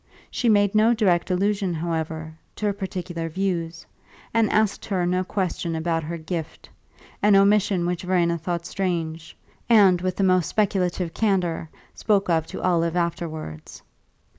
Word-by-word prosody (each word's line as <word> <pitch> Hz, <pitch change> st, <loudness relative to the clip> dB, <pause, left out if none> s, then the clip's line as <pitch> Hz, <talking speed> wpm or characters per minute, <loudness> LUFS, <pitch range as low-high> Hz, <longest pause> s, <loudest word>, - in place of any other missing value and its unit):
She 240 Hz, -, 0 dB
made 205 Hz, -2 st, +3 dB
no 220 Hz, +2 st, +4 dB
direct 185 Hz, -6 st, +2 dB
allusion, 195 Hz, -1 st, 0 dB
however, 160 Hz, -1 st, -3 dB, 0.2 s
to 215 Hz, -, -4 dB
her 205 Hz, -, +1 dB
particular 175 Hz, -4 st, -5 dB
views, 170 Hz, -2 st, -3 dB, 0.5 s
and 225 Hz, -2 st, +3 dB
asked 215 Hz, -2 st, +1 dB
her 185 Hz, -4 st, -1 dB
no 180 Hz, +1 st, +1 dB
question 180 Hz, -3 st, -2 dB
about 165 Hz, 0 st, -1 dB
her 165 Hz, +2 st, -5 dB
"gift" 160 Hz, 0 st, -6 dB, 0.5 s
an 205 Hz, -1 st, +5 dB
omission 195 Hz, -2 st, +3 dB
which 175 Hz, -1 st, -2 dB
Verena 175 Hz, -2 st, +1 dB
thought 170 Hz, +1 st, -3 dB
strange, 170 Hz, -4 st, -3 dB, 0.3 s
and, 195 Hz, -6 st, +6 dB
with 185 Hz, 0 st, -1 dB
the 195 Hz, -, 0 dB
most 185 Hz, -2 st, +3 dB
speculative 185 Hz, -4 st, 0 dB
candour, 180 Hz, -7 st, 0 dB, 0.2 s
spoke 200 Hz, -4 st, +1 dB
of 160 Hz, -1 st, +1 dB
to -, -, -7 dB
Olive 170 Hz, -2 st, +1 dB
afterwards. 165 Hz, -, -4 dB
180 Hz, 145 wpm, -24 LUFS, 165-195 Hz, 0.5 s, and